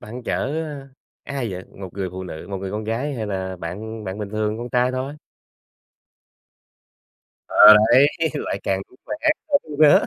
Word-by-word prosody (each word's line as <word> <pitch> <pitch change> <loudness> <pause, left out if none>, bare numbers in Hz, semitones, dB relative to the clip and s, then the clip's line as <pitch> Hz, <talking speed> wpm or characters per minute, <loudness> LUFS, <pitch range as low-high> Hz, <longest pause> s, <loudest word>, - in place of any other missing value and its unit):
bạn 120 +4 -8
chở, 135 - -1 0.7
a, 140 - -6
ai 120 -5 -2
vậy? 95 0 -6 0.2
Một 95 - -5
người 95 -2 -3
phụ 95 +1 -6
nữ 80 -3 -8
một 100 - -3
người 95 0 -5
con 105 +2 -4
gái 125 +7 -2
hay 110 -4 -3
là 95 -2 -3
bạn 105 +6 -6
bạn 95 +1 -5
bình 105 -2 -5
thường 110 0 -1
con 120 +1 -5
trai 125 +1 +2
thôi? 130 +3 -4 2.3
Ờ, 105 0 +9 0.2
đấy, 135 +4 +8 0.3
lại 120 -8 -3
càng 95 0 0
vui - - -21
vẻ - - -3 0.3
hơn 155 - 0
nữa. 150 -2 +6
110 Hz, 180 wpm, -22 LUFS, 95-125 Hz, 2.3 s, Ờ